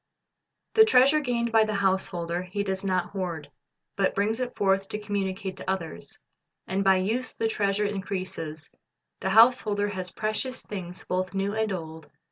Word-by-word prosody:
The 440 Hz, -, +8 dB
treasure 300 Hz, -, +5 dB
gained 240 Hz, -4 st, -1 dB
by 225 Hz, -1 st, +6 dB
the 215 Hz, -1 st, -2 dB
householder 185 Hz, -3 st, 0 dB
he 185 Hz, +3 st, -3 dB
does 190 Hz, -1 st, -2 dB
not 185 Hz, -2 st, 0 dB
hoard. 170 Hz, -7 st, -4 dB, 0.5 s
He 195 Hz, -, +4 dB
brings 215 Hz, +4 st, 0 dB
it 250 Hz, -1 st, -3 dB
forth 195 Hz, -1 st, +2 dB
to -, -, -3 dB
communicate 195 Hz, -2 st, -3 dB
to -, -, -6 dB
others. 180 Hz, -5 st, -4 dB, 0.5 s
And 190 Hz, +1 st, -1 dB
by 195 Hz, -1 st, +5 dB
use 220 Hz, +7 st, -1 dB
the 225 Hz, -, 0 dB
treasure 205 Hz, -1 st, 0 dB
increases. 185 Hz, -6 st, -4 dB, 0.5 s
The 190 Hz, -, -1 dB
householder 215 Hz, -1 st, +5 dB
has 185 Hz, -2 st, -4 dB
precious 215 Hz, +7 st, -3 dB
things 180 Hz, -3 st, -7 dB
both 185 Hz, +1 st, -2 dB
new 195 Hz, +1 st, 0 dB
and 220 Hz, -1 st, 0 dB
old. 160 Hz, -3 st, -6 dB
195 Hz, 160 wpm, -27 LUFS, 185-215 Hz, 0.5 s, The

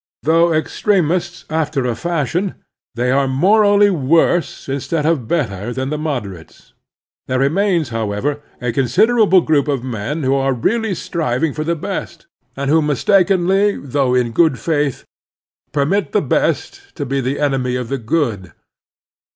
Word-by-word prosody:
Though 165 Hz, +3 st, +3 dB
extremists 175 Hz, +1 st, 0 dB
after 155 Hz, -4 st, -1 dB
a 120 Hz, -, 0 dB
fashion, 170 Hz, -, -2 dB, 0.4 s
they 125 Hz, +1 st, 0 dB
are 135 Hz, +1 st, +2 dB
morally 205 Hz, +8 st, +4 dB
worse 165 Hz, +2 st, +1 dB
instead 140 Hz, +3 st, -2 dB
of 155 Hz, -8 st, 0 dB
better 110 Hz, -, -2 dB
than 130 Hz, +2 st, -3 dB
the 150 Hz, -, -1 dB
mod 150 Hz, -6 st, -2 dB
erates. 90 Hz, -5 st, -13 dB, 0.6 s
There 130 Hz, -, 0 dB
remains, 165 Hz, +2 st, +1 dB
however, 115 Hz, +6 st, -2 dB, 0.2 s
a 125 Hz, -2 st, -2 dB
considerable 190 Hz, -, +3 dB
group 150 Hz, -3 st, +1 dB
of 140 Hz, -4 st, -1 dB
men 130 Hz, +5 st, -4 dB
who 130 Hz, +1 st, +2 dB
are 135 Hz, 0 st, +1 dB
really 220 Hz, -, 0 dB
striving 155 Hz, -3 st, -2 dB
for 155 Hz, -, -3 dB
the 170 Hz, +2 st, -1 dB
best, 155 Hz, -, -6 dB, 0.3 s
and 140 Hz, 0 st, -2 dB
who 160 Hz, +1 st, +4 dB
mistakenly, 190 Hz, +5 st, +2 dB
though 135 Hz, -2 st, 0 dB
in 125 Hz, -2 st, +1 dB
good 160 Hz, 0 st, +3 dB
faith, 145 Hz, +1 st, -1 dB, 0.7 s
permit 155 Hz, +8 st, 0 dB
the -, -, +3 dB
best 395 Hz, 0 st, -2 dB
to 145 Hz, -, -4 dB
be 135 Hz, +1 st, -1 dB
the 130 Hz, +3 st, -2 dB
enemy 135 Hz, -4 st, 0 dB
of 125 Hz, -1 st, -3 dB
the 135 Hz, 0 st, -2 dB
good. 110 Hz, -, -2 dB
145 Hz, 150 wpm, -18 LUFS, 130-170 Hz, 0.7 s, morally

